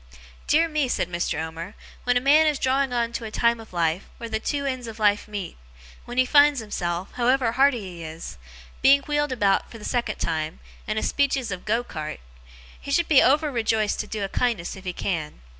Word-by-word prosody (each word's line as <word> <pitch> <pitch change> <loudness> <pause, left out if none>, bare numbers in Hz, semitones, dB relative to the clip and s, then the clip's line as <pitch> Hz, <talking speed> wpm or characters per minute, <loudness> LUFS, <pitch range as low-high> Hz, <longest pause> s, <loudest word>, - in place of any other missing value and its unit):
Dear 325 +2 +4
me!' 305 -4 0
said 180 -7 -1
Mr. 170 -3 -1
Omer, 165 +5 -6 0.3
'when 245 0 +3
a - - +1
man 300 +4 +5
is 300 -2 +1
drawing 265 0 +1
on 235 -1 0
to 235 - -4
a 220 - -5
time 235 +2 +1
of 225 - -12
life, 170 +1 0
where 230 -1 -7
the 220 0 -1
two 280 +4 -2
ends 255 -3 -3
of 225 -1 -8
life 205 -1 +2
meet; 205 - -6 0.5
when 240 +1 -8
he 255 - +5
finds 285 +1 +5
himself, 180 -4 -3
however 250 -1 +2
hearty 265 -1 +3
he 180 -4 -8
is, 160 - -8 0.4
being 280 +1 +6
wheeled 295 -1 0
about 205 -6 +1
for 230 - -10
the 210 - -10
second 235 -4 -1
time, 160 -1 -3 0.3
in 215 - -2
a - - 0
speeches 270 -5 0
of 180 -1 -6
go 230 +3 +1
cart; 155 -9 -6 0.6
he - - -10
should 330 +4 +2
be 290 -4 +6
over 295 +3 +3
rejoiced 220 -3 0
to 210 - -3
do 210 -1 -4
a - - -1
kindness 220 -5 -1
if 190 0 -12
he 180 - -3
can. 160 - -3
230 Hz, 215 wpm, -24 LUFS, 190-265 Hz, 0.6 s, being